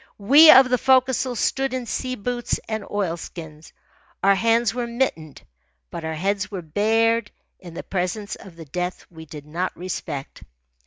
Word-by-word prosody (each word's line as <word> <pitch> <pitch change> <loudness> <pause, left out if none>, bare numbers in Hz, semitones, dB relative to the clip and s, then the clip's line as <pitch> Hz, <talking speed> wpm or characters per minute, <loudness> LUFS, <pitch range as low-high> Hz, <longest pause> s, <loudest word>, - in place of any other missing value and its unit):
We 280 +10 +7
of 265 -2 +9
the 250 - +2
forecastle 260 -1 +2
stood 270 +3 -1
in 255 -1 -4
sea 255 +3 -3
boots 245 +2 -3
and 220 -1 -3
oilskins. 165 -5 -5 0.5
Our 200 +1 +6
hands 230 +2 +2
were 245 -1 -3
mittened, 235 - -3 0.5
but 165 - -6
our 160 0 -3
heads 195 +4 -1
were 190 -4 -6
bared 225 +6 +1 0.3
in 175 -3 -12
the - - -6
presence 195 +3 -3
of 190 -4 -14
the 165 -1 -11
death 180 +5 -4
we 160 -1 -12
did 145 0 -10
not 175 +4 -4
respect. 160 -6 -6
200 Hz, 160 wpm, -22 LUFS, 170-240 Hz, 0.5 s, of